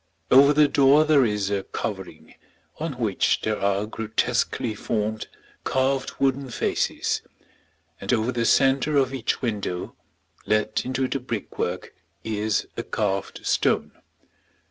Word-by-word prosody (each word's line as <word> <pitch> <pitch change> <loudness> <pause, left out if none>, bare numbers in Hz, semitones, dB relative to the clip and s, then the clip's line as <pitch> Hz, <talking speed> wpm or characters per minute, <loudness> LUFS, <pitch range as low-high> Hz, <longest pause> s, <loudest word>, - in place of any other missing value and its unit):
Over 140 +2 +8
the 150 0 +5
door 140 +2 +5
there 150 -4 +5
is 105 -2 -1
a 100 -1 0
covering, 95 -4 -6 0.5
on 160 -1 -3
which 115 -6 0
there 110 -2 -2
are 100 +1 +1
grotesquely 110 +1 -1
formed, 110 0 -2 0.4
carved 130 0 0
wooden 135 0 0
faces; - - -1 0.8
and - - -2
over 115 +1 +1
the 120 -1 -1
centre 135 +4 +3
of 135 -1 +2
each 130 -1 -2
window, 100 -6 -3 0.5
let 110 0 +1
into 130 +1 -1
the 135 - -2
brickwork, 120 -5 -4 0.3
is 110 -1 -1
a - - -2
carved 100 -2 -3
stone. - - +1
115 Hz, 125 wpm, -24 LUFS, 105-135 Hz, 0.8 s, Over